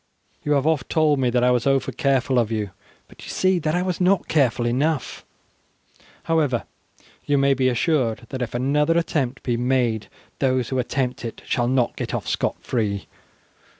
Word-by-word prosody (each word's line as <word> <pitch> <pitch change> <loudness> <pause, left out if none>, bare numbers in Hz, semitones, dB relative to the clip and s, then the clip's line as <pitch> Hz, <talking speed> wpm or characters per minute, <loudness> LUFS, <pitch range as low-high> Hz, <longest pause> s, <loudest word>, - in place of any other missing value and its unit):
You 150 - +1
have 140 -1 +2
oft 155 -5 +1
told 155 -3 +3
me 125 -2 +2
that 120 0 +1
I 125 - +4
was 125 +1 +1
over 135 -1 +2
careful 135 -3 +1
of 115 -2 0
you, 105 -3 -2 0.4
but - - -16
you - - -9
see 185 -1 +2
that 155 0 -1
I 180 - +1
was 185 -1 -2
not 185 0 +3
careful 125 -6 +2
enough, 140 +5 -1 1.0
however, 145 - +1 0.6
you 145 - +2
may 140 0 +4
be 130 -1 +2
assured 125 -3 0
that 130 - -5
if 120 -1 -3
another 150 +6 +2
attempt 135 -7 -1
be 120 -2 0
made 120 -3 0 0.3
those 130 -3 +1
who 130 - -1
attempt 125 0 -2
it 115 - -7
shall 120 -1 0
not 125 -1 +1
get - - -3
off - - -4
scot - - 0
free. 105 -5 -1
130 Hz, 185 wpm, -23 LUFS, 120-150 Hz, 1.0 s, I